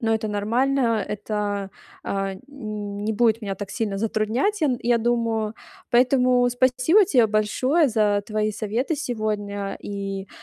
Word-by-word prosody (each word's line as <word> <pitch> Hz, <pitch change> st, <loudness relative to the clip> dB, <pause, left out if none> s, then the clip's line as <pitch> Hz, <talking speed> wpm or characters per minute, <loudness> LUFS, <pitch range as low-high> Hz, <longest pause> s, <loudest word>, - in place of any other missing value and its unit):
но 225 Hz, -2 st, +1 dB
это 220 Hz, -1 st, -2 dB
нормально. 230 Hz, +2 st, +1 dB
Это, 205 Hz, -1 st, -3 dB, 0.3 s
а, 195 Hz, -1 st, -2 dB
н 190 Hz, -, -14 dB, 0.6 s
не 220 Hz, -, 0 dB
будет 225 Hz, +1 st, +2 dB
меня 195 Hz, -2 st, -3 dB
так 200 Hz, 0 st, -6 dB
сильно 205 Hz, -4 st, -2 dB
затруднять, 225 Hz, -, 0 dB
я 305 Hz, -, +3 dB
н 250 Hz, -2 st, 0 dB
я 235 Hz, 0 st, +3 dB
думаю. 230 Hz, -2 st, 0 dB, 0.4 s
Поэтому 250 Hz, 0 st, +4 dB
спасибо 255 Hz, -, +3 dB
тебе 255 Hz, -, +4 dB
большое 255 Hz, +9 st, +2 dB
за 210 Hz, -3 st, +2 dB
твои 215 Hz, 0 st, -1 dB
советы 230 Hz, -, -2 dB
сегодня 210 Hz, -7 st, -3 dB
и, 195 Hz, -1 st, -5 dB
220 Hz, 145 wpm, -23 LUFS, 205-250 Hz, 0.6 s, Поэтому